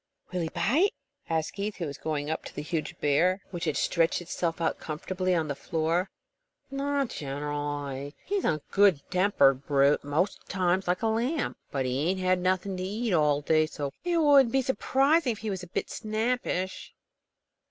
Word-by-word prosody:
"Will 180 -1 -1
he 165 - -2
bite?" 310 - +2 0.3
asked 160 -1 -1
Keith, 205 +1 -4 0.2
going 150 -1 -2
up 160 - -3
to - - -9
the 145 - -4
huge 155 0 -3
bear, 180 +7 +2
which 175 -1 -4
had 155 -3 0
stretched 165 -2 +2
itself 175 -1 -3
out 165 - 0
comfortably 185 +4 -2
on 160 -2 0
the 145 - -1
floor. 165 +5 -1 0.6
"Not 280 -1 0
generally. 145 0 -4
He's 400 0 -1
a 155 -2 0
good 195 -7 +5
tempered 140 -8 +3
brute, 140 0 +3
most 155 +8 -1
times 185 0 +1
like 180 +3 0
a - - +3
lamb. 240 +8 0
But 135 -2 -1
he 135 +6 0
ain't 190 0 0
had 185 0 +2
nothing 185 +1 0
to 185 - -3
eat 215 +3 -2
all 150 -3 +3
day, 155 +1 +3
so 145 -3 -5
it 350 -1 +1
wouldn't 285 -6 +6
be 270 +1 +2
surprising 270 +2 +2
if - - -10
he 220 0 -4
was 190 -2 -4
a 180 - -9
bit 175 - -3
snappish." 215 -4 -2
180 Hz, 175 wpm, -28 LUFS, 150-215 Hz, 0.6 s, wouldn't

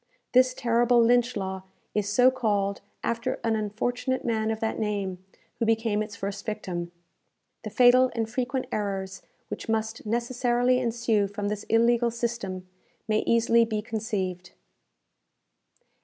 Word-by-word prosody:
This 255 0 +4
terrible 240 0 +3
Lynch 240 0 +3
law 190 -1 -3 0.3
is 205 -1 0
so 250 +5 +5
called 205 -6 0 0.2
after 235 +2 -2
an 225 -1 +1
unfortunate 245 +5 -2
man 220 -2 0
of 220 -1 -2
that 220 0 -2
name, 200 -4 -2 0.4
who 230 - +1
became 225 -2 +1
its 210 0 -5
first 200 -1 -5
victim. 180 -5 -4 0.7
The - - -4
fatal 255 +1 +5
and 225 -1 -1
frequent 255 +3 -2
errors 195 -2 -3 0.3
which - - -6
must 220 0 -1
necessarily 245 +2 +1
ensue 230 -4 +1
from 205 0 -3
this 210 0 -4
illegal 235 +1 +3
system, 230 -6 -4 0.4
may 215 -1 +2
easily 230 0 +4
be 215 -2 -2
conceived. 205 -5 -3
225 Hz, 135 wpm, -26 LUFS, 205-240 Hz, 0.7 s, so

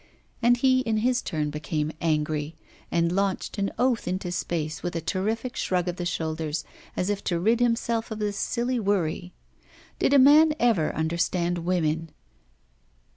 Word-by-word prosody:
And 240 +1 +4
he 260 +1 +4
in 225 -4 0
his 245 +3 +1
turn 150 -4 -2
became 150 0 -2
angry, 155 -1 -1 0.4
and 170 0 +2
launched 195 +2 -1
an 200 0 +1
oath 250 -5 +1
into 180 0 -2
space, 160 -3 -3
with 175 -1 -4
a - - 0
terrific 215 +8 -2
shrug 180 -1 0
of 180 0 -3
the 175 - -2
shoulders, 160 -2 -2 0.3
as 185 +3 0
if 205 - -3
to 170 -2 0
rid 225 +6 +2
himself 230 -1 0
of 220 - -5
this 210 -1 -2
silly 245 +3 -1
worry. 180 -4 -1 0.7
Did 280 - +3
a - - +8
man 300 +3 +7
ever 225 -10 +2
understand 170 +2 0
women? 165 -2 0
180 Hz, 160 wpm, -26 LUFS, 165-230 Hz, 0.7 s, a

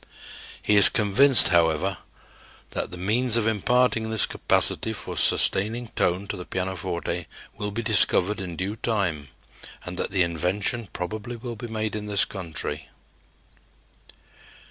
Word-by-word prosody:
He 105 - +2
is 95 -1 +10
convinced, 120 +6 +5
however, 85 +1 +1 0.7
that - - -4
the 90 - -9
means 115 +6 +1
of 115 - -1
imparting 110 +1 0
this 110 -1 +6
capacity - - 0
for - - -7
sustaining 110 +4 +1
tone 90 +3 -2
to - - -4
the 90 - -8
pianoforte 90 -2 -5 0.3
will 105 - -5
be 115 +3 -5
discovered 105 -2 +3
in 90 -3 -7
due 95 +5 -4
time 95 - -2 0.6
and 90 0 -7
that - - -3
the 95 -2 +1
invention 90 +6 -2
probably 110 +6 -6
will 120 0 -8
be 120 +2 -8
made 110 -1 -4
in 105 -1 -6
this 100 -3 +2
country. 90 -5 -5
100 Hz, 140 wpm, -23 LUFS, 90-110 Hz, 0.7 s, is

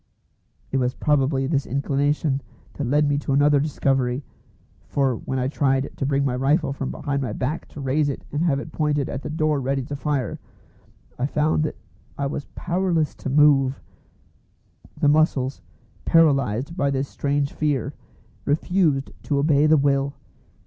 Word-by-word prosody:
It 135 - +1
was 125 -1 0
probably 135 -2 +1
this 140 -1 0
inclination 140 +1 0 0.3
that 145 - -3
led 145 +3 +3
me 145 0 +1
to 140 - -2
another 145 +1 +4
discovery, 135 -3 0 0.6
for 135 -3 +1
when 130 +4 -4
I 130 0 0
tried 135 -1 0
to 135 - -2
bring 140 0 +1
my 125 -2 0
rifle 140 +2 +1
from 135 -1 -4
behind 140 -1 -2
my 120 -5 -3
back 135 +8 -3
to - - -11
raise 145 +2 +1
it 140 - -5
and 145 - -1
have 155 -5 +2
it 155 - -8
pointed 150 -3 0
at 135 - -4
the - - -6
door 155 -2 0
ready 135 +1 -1
to 145 +3 -5
fire, 140 -5 -2 0.8
I 130 - +1
found 150 +1 +1
that - - -4 0.4
I 140 - -1
was 140 +1 -3
powerless 175 -3 0
to - - -6
move. 135 -2 +4 1.2
The - - +3
muscles, 145 -3 +2 0.4
paralysed 140 -3 +2
by 140 -6 +1
this 135 0 -1
strange 140 0 -1
fear, 145 -5 -1 0.5
refused 150 -2 +1
to 145 - -1
obey 145 +1 +3
the 155 0 +5
will. 140 0 +1
140 Hz, 165 wpm, -23 LUFS, 135-150 Hz, 1.2 s, the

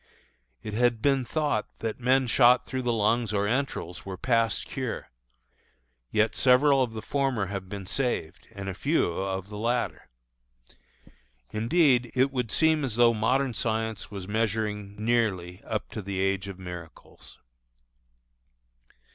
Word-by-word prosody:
It 110 -2 -5
had 120 0 +2
been 135 +2 +2
thought 145 -4 -2
that 115 +1 -4
men 130 +2 +3
shot 125 +1 +5
through 130 -1 -3
the 120 -1 0
lungs 115 +1 +1
or 100 -1 +1
entrails 125 - -2
were 95 -1 -6
past 115 -1 +1
cure, 130 -4 -4 1.0
yet 110 - +1
several 135 +2 +5
of 120 -3 -1
the 110 - -6
former 135 -7 0
have 95 -1 -5
been 100 -1 -6
saved, 100 -6 -2
and 100 -2 -7
a 95 - -2
few 140 - +1
of 95 +2 -3
the 105 -1 -7
latter. 120 - -1 1.4
Indeed, 125 +1 +3
it 130 +2 +3
would 125 -4 -2
seem 160 -2 +3
as 125 -6 -2
though 120 0 +5
modern 125 +4 +1
science 110 -1 -2
was 100 -3 -7
measuring 105 -2 -1
nearly 105 -5 0
up 110 -2 -3
to 110 - -5
the 100 -1 -4
age 95 0 0
of 95 -2 -7
miracles. 90 -3 -11
110 Hz, 145 wpm, -27 LUFS, 100-125 Hz, 1.4 s, shot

